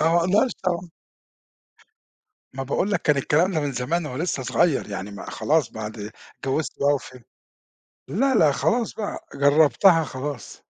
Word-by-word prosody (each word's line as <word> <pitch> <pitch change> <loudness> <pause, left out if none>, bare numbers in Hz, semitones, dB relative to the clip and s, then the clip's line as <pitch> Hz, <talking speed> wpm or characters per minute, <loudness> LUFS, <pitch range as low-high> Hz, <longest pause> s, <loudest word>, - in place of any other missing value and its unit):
أنا 160 +2 +3
ما 170 - +3
أقدرش 200 +9 +2
طبعًا. 175 -1 -2 1.6
ما 135 - -4
باقول 160 +9 -1
لك 200 - 0
كان 150 -2 +3
الكلام 160 +7 +2
ده 160 - 0
من 145 -2 -2
زمان 150 +7 -1
وأنا 130 +4 -4
لسه 150 -7 -2
صغير 140 0 +1
يعني 100 +1 -5
ما 100 - -8
خلاص 155 -4 +1
بعد 110 -1 -6 0.3
اتجوزت 135 +3 -2
بَقى 145 +1 +4
و - - 0
فهمت 125 -3 -13 0.8
لا 270 -1 +1
لأ 155 -9 +5
خلاص 230 - 0
بَقى 210 -2 -5
جربتها 155 +4 +4
خلاص. 135 -1 -7
150 Hz, 160 wpm, -23 LUFS, 130-175 Hz, 1.6 s, لأ